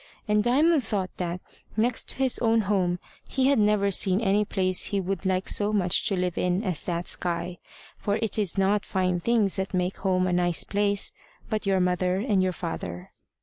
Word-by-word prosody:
And 210 0 +2
Diamond 290 +5 +3
thought 195 -4 -3
that, 180 0 -3 0.4
next 230 +2 +1
to - - +1
his 265 -2 0
own 225 -1 +3
home, 185 -3 0 0.3
he 265 0 +2
had 280 - +3
never 210 -1 +2
seen 190 0 +3
any 210 -1 +2
place 185 -3 +1
he 200 - 0
would 190 0 -3
like 185 0 0
so 205 0 +2
much 185 -4 +1
to 195 - 0
live 180 -1 -2
in 180 +3 0
as 180 -7 -2
that 170 0 -3
sky. 175 0 -2 0.4
For 205 - -1
it 220 0 0
is 200 -2 0
not 200 +1 +2
fine 185 -2 -1
things 215 0 +1
that 190 0 -3
make 180 +1 -1
home 185 -1 +1
a 180 - 0
nice 175 -1 +2
place, 205 0 0 0.4
but 215 -2 -2
your 195 -1 +2
mother 180 0 +1
and 200 -1 +1
your 185 0 +1
father. 90 - -6
195 Hz, 195 wpm, -26 LUFS, 180-210 Hz, 0.4 s, Diamond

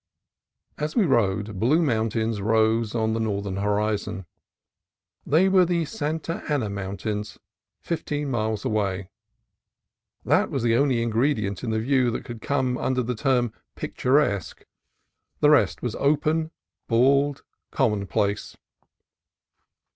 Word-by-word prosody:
As 150 +1 -3
we 220 - +4
rode, 105 - +1
blue 150 - +3
mountains 110 -4 0
rose 110 +1 +2
on 110 -1 +1
the 115 - -1
northern 100 -3 -2
horizon. 105 -1 -1 1.0
They 165 +6 +4
were 190 -1 +5
the 170 -2 0
Santa 160 -1 -3
Ana 125 -9 0
Mountains, 100 +2 -4 0.4
fifteen 150 -4 -3
miles 110 -1 -1
away. 100 -5 -1 1.1
That - - +3
was 135 - -2
the 115 -1 +3
only 130 -3 +2
ingredient 110 -4 0
in 120 - -2
the 110 0 0
view 130 +1 +2
that 115 - -4
could 120 -2 -8
come 130 -3 0
under 130 -1 0
the 125 +2 -2
term 125 -1 +1 0.2
"pic - - -6
turesque": 125 -7 +1 0.7
the 150 - +5
rest 145 - +3
was 120 -3 -2
open, 155 +4 +1 0.4
bald, 140 +4 +3 0.3
commonplace. 100 0 -1
115 Hz, 125 wpm, -25 LUFS, 105-140 Hz, 1.1 s, were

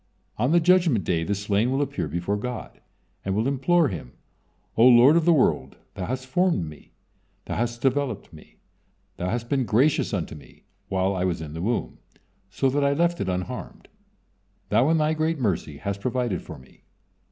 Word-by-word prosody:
On 125 +6 +2
the 175 - +5
Judgement 170 - +3
Day 85 -2 0
the 100 +4 -1
slain 105 +3 0
will 135 - 0
appear 140 - -2
before 85 +6 -2
God, 120 +3 -6 0.4
and 95 0 -2
will 110 +4 +1
implore 140 +4 +2
Him: 80 - -7 0.6
"O 115 - +4
Lord 125 +4 +7
of 170 -2 +3
the 175 - +5
world! 75 - +1 0.2
Thou 95 -2 -5
hast 130 +1 -3
formed 170 - +1
me, 75 -1 -13 0.5
Thou - - -4
hast 120 +1 -2
developed 130 -8 -1
me, 75 - -15 0.6
Thou 90 0 -2
hast 120 +2 -3
been 135 +1 +1
gracious 130 +6 +2
unto 90 -8 -3
me 75 -2 -15 0.3
while 95 0 0
I 90 - -1
was 90 -3 -1
in 75 -2 -7
the 80 - -5
womb, 115 +5 -2 0.5
so 135 - 0
that 145 +1 +1
I 140 0 +3
left 170 +3 +1
it 95 - -1
unharmed. 90 -1 -5 0.8
Thou 130 +5 +3
in 165 - +3
Thy 155 0 +2
great 160 +1 0
mercy 90 - -2
hast 100 +6 -4
provided 120 -6 -1
for - - -10
me. 65 - -19
120 Hz, 185 wpm, -25 LUFS, 95-140 Hz, 0.8 s, Lord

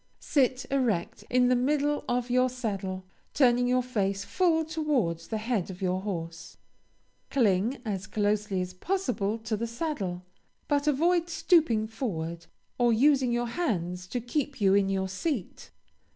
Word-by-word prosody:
Sit 260 -3 +1
erect 240 -11 0
in 250 0 +4
the 250 - +4
middle 290 +3 +1
of 245 0 -1
your 255 +1 +3
saddle, 195 -7 -4 0.3
turning 245 -3 +4
your 250 0 +2
face 200 -5 -1
full 330 -3 +2
towards 280 - -1
the 220 - -2
head 215 -4 -1
of 185 -1 -8
your 185 -1 0
horse. 170 -5 -6 0.7
Cling 225 -1 +2
as 190 -3 -3
closely 205 -1 0
as 180 0 -5
possible 235 - -1
to 220 -1 -3
the 230 +2 -3
saddle, 225 - -3 0.4
but 290 0 +1
avoid 340 +4 +2
stooping 320 - +3
forward, 170 -8 -4 0.3
or 240 -1 +4
using 260 +1 +4
your 240 0 0
hands 180 - -2
to 245 - -2
keep 265 +3 -3
you 195 -2 +4
in 195 -1 +3
your 190 -1 0
seat. 195 - -4
235 Hz, 150 wpm, -28 LUFS, 195-270 Hz, 0.7 s, in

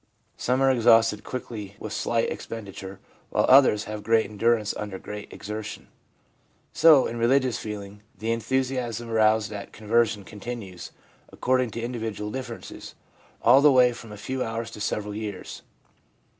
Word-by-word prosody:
Some 130 +2 0
are 135 - +5
exhausted 115 -3 +4
quickly 110 -6 -6
with 110 - -6
slight 115 +1 0
ex - - -6
penditure, 100 -3 -7 0.3
while - - +2
others 130 -6 +6
have 105 -1 -6
great 115 +1 +3
endurance 110 +1 +1
under 105 -2 -5
great 105 +2 -8
exertion. 105 +1 -7 0.8
So, 155 -4 +6
in 115 - -4
religious 130 +1 +2
feeling, 105 -1 -7 0.2
the 110 +1 -2
enthusiasm 120 -1 -2
aroused 110 -1 +3
at 100 -1 -7
conversion 110 -1 +1
continues, 105 -3 -8 0.4
according 130 -1 +1
to - - -2
individual 110 -3 -4
differences, 130 +1 -7 0.5
all 125 +4 +7
the 150 0 +7
way 125 -2 +5
from 115 -2 -11
a 105 - -8
few 130 +5 -3
hours 115 0 -4
to 105 - -9
several 105 0 -2
years. 105 -3 -6
115 Hz, 145 wpm, -25 LUFS, 105-125 Hz, 0.8 s, all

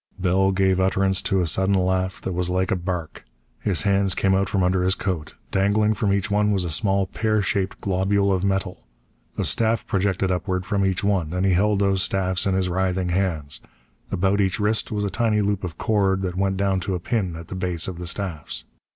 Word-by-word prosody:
Bell 95 +1 +2
gave 95 -1 +2
utterance 95 0 +2
to 95 -1 +1
a - - +1
sudden 95 +5 +2
laugh 95 0 0
that 95 - -3
was 90 0 0
like 95 0 0
a - - +3
bark. 90 -3 -4 0.4
His 90 -8 0
hands 100 -1 +2
came 95 0 +2
out 95 +1 +1
from 95 -2 +1
under 90 0 +2
his 95 +1 +2
coat. 85 -7 -4 0.2
Dangling 105 +3 +2
from 105 -2 0
each 100 +1 0
one 105 0 +2
was 100 -3 +1
a 85 - -3
small, 95 +3 +1
pear 110 +3 0
shaped 95 0 -1
globule 100 +1 +1
of 95 0 -1
metal. 95 -7 -2 0.5
A - - 0
staff 115 0 0
projected 95 -1 0
upward 90 0 -1
from 100 0 0
each 95 +1 0
one, 95 -6 0
and 90 +1 0
he 95 - +3
held 105 +3 +2
those 100 -1 +2
staffs 95 -1 0
in 95 - +1
his 95 -1 +1
writhing 90 0 0
hands. 85 -6 -1 0.5
About 95 +3 +1
each 95 0 0
wrist 105 +1 0
was 105 -1 -1
a 100 - -1
tiny 115 -3 +1
loop 100 -1 -1
of 85 -2 -5
cord 95 -3 +1
that 90 -2 -2
went 95 0 0
down 100 -1 +1
to 95 +1 -2
a - - -3
pin 95 -3 -2
at 85 0 -9
the - - -5
base 90 -3 -1
of 90 -2 -6
the 90 - -5
staffs. 85 -4 -3
95 Hz, 220 wpm, -23 LUFS, 90-100 Hz, 0.5 s, a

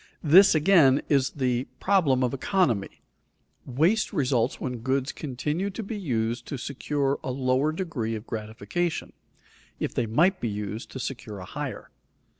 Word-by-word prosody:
This 175 +4 +7
again 150 -5 +5
is 135 -2 +3
the 125 -2 -1
problem 160 -10 +3
of 125 - 0
"economy." 135 - 0 0.6
Waste 165 - +2
results 130 - 0
when 125 -2 -4
goods 130 +3 -1
continue 150 +7 -3
to 210 +3 -6
be 215 +2 -5
used 120 - -2
to 140 - -4
secure 140 +2 -2
a - - -3
lower 130 +3 +1
degree 155 -10 -3
of 110 +1 -7
gratification, 110 +10 -3 0.7
if - - -2
they 120 - 0
might 175 - +2
be 115 - -1
used 105 +2 -5
to 130 - -5
secure 115 -5 -5
a 95 - -8
higher. - - -6
135 Hz, 150 wpm, -26 LUFS, 120-160 Hz, 0.7 s, This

